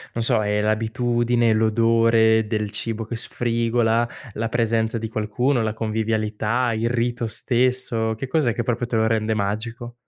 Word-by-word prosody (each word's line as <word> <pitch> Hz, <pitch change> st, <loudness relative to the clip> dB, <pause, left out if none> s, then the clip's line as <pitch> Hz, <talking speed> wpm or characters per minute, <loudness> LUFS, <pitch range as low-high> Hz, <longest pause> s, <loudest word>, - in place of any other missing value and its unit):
Non 115 Hz, -, -1 dB
so 110 Hz, -, +3 dB
è 105 Hz, 0 st, 0 dB
l'abitudine, 115 Hz, +2 st, +1 dB
l'odore 110 Hz, 0 st, +3 dB
del 105 Hz, -1 st, -2 dB
cibo 115 Hz, +2 st, -2 dB
che 115 Hz, -, -5 dB
sfrigola, 115 Hz, 0 st, 0 dB, 0.2 s
la 115 Hz, +1 st, -3 dB
presenza 115 Hz, -1 st, 0 dB
di 110 Hz, 0 st, -4 dB
qualcuno, 115 Hz, +4 st, 0 dB
la 110 Hz, 0 st, -2 dB
convivialità, 110 Hz, +2 st, -1 dB
il 115 Hz, +2 st, -1 dB
rito 120 Hz, -1 st, -1 dB
stesso, 120 Hz, -1 st, 0 dB
che 135 Hz, -, -4 dB
cos'è 130 Hz, -3 st, +1 dB
che 120 Hz, -, -1 dB
proprio 120 Hz, 0 st, -2 dB
te 120 Hz, -, -3 dB
lo 110 Hz, 0 st, +2 dB
rende 110 Hz, -1 st, 0 dB
magico? 115 Hz, +4 st, -3 dB
115 Hz, 155 wpm, -22 LUFS, 110-120 Hz, 0.2 s, so